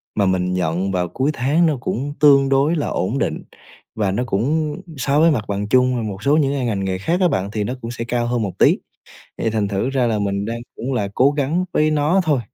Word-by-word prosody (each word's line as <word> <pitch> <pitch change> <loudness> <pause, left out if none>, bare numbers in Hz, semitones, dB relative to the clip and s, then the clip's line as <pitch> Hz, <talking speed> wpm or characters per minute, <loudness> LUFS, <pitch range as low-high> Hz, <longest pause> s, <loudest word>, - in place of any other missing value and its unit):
mà 100 - +2
mình 90 -1 0
nhận 90 +2 -1
vào 90 -2 0
cuối 130 - -1
tháng 145 +7 +2
nó 155 -4 +1
cũng 135 +3 -3
tương 140 -2 +5
đối 140 +5 +2
là 150 - -1
ổn 95 +9 -1
định, - - -2 0.5
và 105 -3 0
nó 120 +6 -1
cũng 145 +8 0 0.2
so 140 +2 +1
với 165 +1 +5
mặt 115 -8 -1
bằng 100 0 -2
chung 125 +2 +3
và 120 - -2
một 105 -2 -5
số 145 +2 +3
những 140 -3 +2
cái 135 -3 -2
ngành 105 -4 -1
nghề 95 -1 -1
khác 165 - -1
á 180 - +5
bạn 95 - -2
thì 105 -1 -2
nó 120 - -3
cũng 115 - -5
sẽ 120 - -5
cao 120 -1 -1
hơn 120 -1 0
một 100 -4 -4
tí, - - +5 0.6
thì 115 - 0
thành 105 -2 -1
thử 100 +6 -1
ra 130 -2 +1
là 110 -2 0
mình 100 -1 -1
đang, 115 +2 -4 0.2
cũng 130 +3 -4
là, 105 -6 -1
cố 135 +3 +4
gắng 145 +5 0
với 155 0 +2
nó 155 +5 +2
thôi. 150 -5 +2
120 Hz, 255 wpm, -20 LUFS, 100-145 Hz, 0.6 s, tương